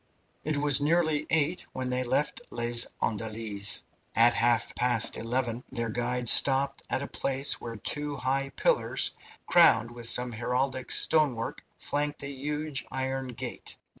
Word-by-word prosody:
It 155 -1 -1
was 145 -1 +4
nearly 155 -1 +1
eight 160 +2 +1
when 130 -1 -3
they 125 0 -1
left 150 - -1
Les 120 0 0 0.2
Andelys. 110 -2 -3 0.3
At 120 +2 +6
half 115 0 +2
past 120 -2 +1
eleven 120 +1 -2
their 120 -3 -3
guide 120 +1 -2
stopped 135 +3 +5
at 135 - -1
a - - -5
place 135 +1 0
where 115 -1 -6
two 145 +6 -3
high 135 +1 -1
pillars, - - +1 0.3
crowned 120 -10 +5
with 120 -1 -3
some 125 0 +1
heraldic 125 +3 -2
stonework, 140 -8 +2 0.2
flanked 145 0 -3
a 140 - -5
huge 150 +1 -3
iron 130 0 -3
gate. 125 - -7
130 Hz, 140 wpm, -28 LUFS, 120-145 Hz, 0.3 s, At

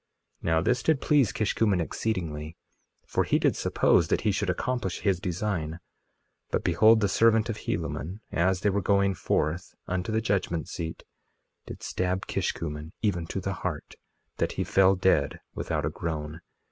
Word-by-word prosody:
2:9 - - -28
Now 80 0 +3
this 125 +7 +1
did 160 0 +2
please 140 -8 +3
Kishkumen 105 -2 +1
exceedingly, 80 -4 -3 0.5
for - - 0
he - - +2
did - - +2
suppose 85 - +3
that - - +1
he 105 - +2
should 100 0 -1
accomplish 110 -1 -2
his 95 -4 +1
design; 90 -3 -2 0.7
but - - -1
behold, 110 +6 +5
the 100 - +3
servant 110 +3 +3
of 110 - -2
Helaman, 90 - -3
as 90 +2 +1
they 105 - +2
were 100 +1 0
going 100 0 +3
forth 85 -1 -1
unto 95 +3 -2
the 110 - +2
judgment 95 -7 -1
seat, 80 -1 -5 0.6
did - - -9
stab 90 +1 -1
Kishkumen 75 +1 -3
even 90 -6 0
to 95 - -3
the 95 +1 -2
heart, - - -4 0.4
that - - 0
he - - -1
fell 95 0 +4
dead 90 -7 +2
without 75 -2 -2
a 75 - -1
groan. 80 -1 -4
95 Hz, 165 wpm, -27 LUFS, 80-105 Hz, 0.7 s, behold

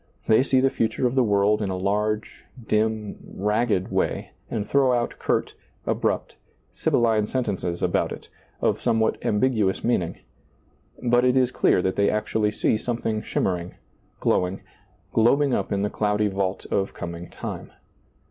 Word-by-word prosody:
They 110 +2 +5
see 130 -1 +2
the 135 0 +3
future 115 +3 0
of 125 - +1
the 130 -1 +3
world 105 0 +2
in 100 - -1
a 95 - -2
large, 105 +3 -1 0.2
dim, 110 -1 0 0.2
ragged 105 -1 0
way, - - -1 0.2
and 105 -2 -2
throw 135 +1 +3
out 120 -1 -1
curt, - - 0 0.3
abrupt, - - -1 0.4
sibylline 110 -3 +2
sentences 95 -9 -2
about - - +1
it, - - -8 0.3
of - - +1
some 110 - +2
what 110 - 0
ambiguous 105 -3 +1
meaning; 90 -8 0 0.9
but 120 0 +3
it 125 +1 +3
is 130 -1 +3
clear 90 - +3
that 95 - -1
they 100 0 +3
actually 105 0 0
see 110 +1 0
something 115 -3 -2
shimmering, 90 -4 -2 0.4
glowing, 90 +1 +1 0.5
glob 120 +6 +4
ing 140 -3 +1
up - - -1
in 100 0 0
the 105 - 0
cloudy 105 0 +1
vault 95 -1 -2
of 95 0 0
coming 85 0 -6
time. - - -7
105 Hz, 155 wpm, -24 LUFS, 100-120 Hz, 0.9 s, They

